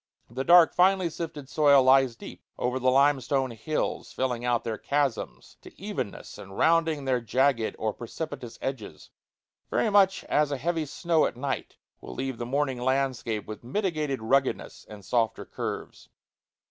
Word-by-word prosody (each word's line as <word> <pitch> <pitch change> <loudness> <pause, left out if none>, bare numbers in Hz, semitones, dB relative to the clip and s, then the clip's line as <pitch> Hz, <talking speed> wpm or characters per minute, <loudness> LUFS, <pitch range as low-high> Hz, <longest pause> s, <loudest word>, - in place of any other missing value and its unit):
The 130 +3 -3
dark, 175 +2 +7
finely 185 -1 +3
sifted 155 -4 -6
soil 140 -2 +5
lies 130 -2 +4
deep - - -11
over 125 +1 -1
the 130 0 +2
limestone 135 -1 +2
hills, 115 +7 -3
filling 125 -2 -2
out 120 -1 +1
their 110 -2 -4
chasms 140 -3 -2
to - - -15
evenness, 145 - -6
and 95 0 -10
rounding 160 -3 +2
their 130 -2 +1
jagged 125 0 +1
or 110 -1 -2
precipitous 120 -1 -7
edges, 130 -6 -6 0.6
very 220 - +1
much 195 -1 +4
as 150 -1 +1
a 140 - -1
heavy 165 +1 -2
snow 165 +2 +1
at - - -8
night 140 +2 -4 0.2
will - - -10
leave 130 -2 -4
the 120 - -4
morning 135 -1 -1
landscape 130 -5 -1
with 110 +1 -8
mitigated 150 - -2
ruggedness 135 +4 0
and 105 -3 -11
softer 115 +1 0
curves. - - -6
135 Hz, 155 wpm, -27 LUFS, 120-155 Hz, 0.6 s, dark